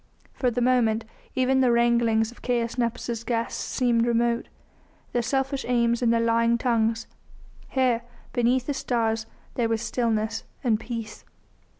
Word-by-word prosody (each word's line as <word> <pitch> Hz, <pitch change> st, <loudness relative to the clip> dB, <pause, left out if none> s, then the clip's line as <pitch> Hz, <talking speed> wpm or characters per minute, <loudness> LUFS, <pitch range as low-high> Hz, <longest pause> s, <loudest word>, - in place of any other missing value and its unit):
For 255 Hz, -, +1 dB
the 245 Hz, +1 st, -2 dB
moment 235 Hz, -3 st, +2 dB, 0.3 s
even 260 Hz, +1 st, +3 dB
the 250 Hz, -2 st, +4 dB
wranglings 235 Hz, -1 st, +3 dB
of 240 Hz, -, -17 dB
Caius 235 Hz, -2 st, -1 dB
Nepos' 235 Hz, -1 st, -2 dB
guests 230 Hz, -1 st, -2 dB
seemed 240 Hz, -2 st, +1 dB
remote, 235 Hz, 0 st, +1 dB, 0.7 s
their 240 Hz, -, +2 dB
selfish 270 Hz, +3 st, -1 dB
aims 235 Hz, -1 st, +2 dB
and 235 Hz, -2 st, +3 dB
their 230 Hz, -, +3 dB
lying 230 Hz, 0 st, +3 dB
tongues. 230 Hz, -2 st, +1 dB, 0.6 s
Here, 255 Hz, -3 st, +2 dB, 0.3 s
beneath 245 Hz, +1 st, +2 dB
the 290 Hz, -, -1 dB
stars, 225 Hz, -4 st, -1 dB, 0.3 s
there 235 Hz, -2 st, 0 dB
was 225 Hz, 0 st, 0 dB
stillness 225 Hz, -2 st, -1 dB, 0.2 s
and 225 Hz, -4 st, +2 dB
peace. 230 Hz, -2 st, -6 dB
235 Hz, 140 wpm, -25 LUFS, 230-245 Hz, 0.7 s, the